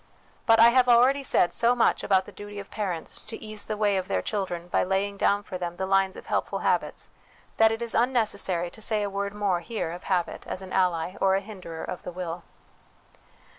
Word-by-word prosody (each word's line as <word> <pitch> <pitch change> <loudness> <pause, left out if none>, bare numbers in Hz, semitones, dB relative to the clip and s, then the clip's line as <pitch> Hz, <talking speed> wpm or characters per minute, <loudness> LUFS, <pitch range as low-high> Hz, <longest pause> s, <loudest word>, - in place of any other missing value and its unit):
But 225 - +7
T 225 - +6
have 250 +2 +5
already 250 +4 +5
said 180 -9 +2
so 235 +1 +3
much 240 - +2
about 190 -2 +2
the - - -11
duty 205 0 -10
of 200 - -10
parents 185 -6 -3
to 225 - -8
ease 215 -1 -4
the 215 - -4
way 205 -2 +2
of 185 - -3
their 95 -1 -1
children 180 -4 -3
by - - +1
laying 195 +2 -1
down 200 +1 +1
for 185 -3 -7
them 175 -1 -4
the 190 - -3
lines 195 0 +2
of - - -10
helpful - - -1
habits, - - -1 0.5
that 220 0 +5
it 225 +1 -3
is 235 - -4
unnecessary 210 -8 +1
to 220 - -12
say 215 -1 +1
a 200 - -3
word 200 +1 -3
more 200 -4 0
here 215 -3 -4
of 175 +1 -9
habit 180 -3 -1
as 190 - -5
an 185 - -9
ally 180 -1 0
or 190 0 +4
a - - +2
hinderer 190 -5 -8
of 180 - -6
the - - -7
will. 175 -1 -5
200 Hz, 220 wpm, -26 LUFS, 180-220 Hz, 0.5 s, But